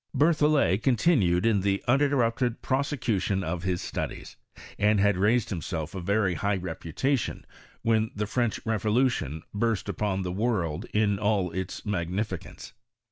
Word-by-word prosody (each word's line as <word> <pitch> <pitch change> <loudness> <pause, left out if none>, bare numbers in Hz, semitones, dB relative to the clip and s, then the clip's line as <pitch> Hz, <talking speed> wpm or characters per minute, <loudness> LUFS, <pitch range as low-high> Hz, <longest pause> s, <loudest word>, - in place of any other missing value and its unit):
Berthollet 150 - +3
continued 110 - +3
in 110 -4 +3
the 100 0 0
uninterrupted 125 -2 +2
prose 135 +2 0
cution 105 -8 -1
of 85 +1 -3
his 90 -1 -2
studies, - - -5 0.4
and 105 0 +3
had 100 0 +3
raised 105 +5 +2
himself 80 -2 -4
a 95 - -5
very 100 +1 +1
high 100 +5 0
reputation 95 - -2 0.4
when 110 -1 +2
the 105 +1 -1
French 120 0 -1
revolution 110 - 0
burst 110 -1 0
upon 95 -3 -1
the 90 - -3
world 95 -7 -1
in 105 -2 +1
all 100 -4 +1
its 95 +1 -5
magnificence. 95 0 -4
105 Hz, 135 wpm, -27 LUFS, 95-115 Hz, 0.4 s, Berthollet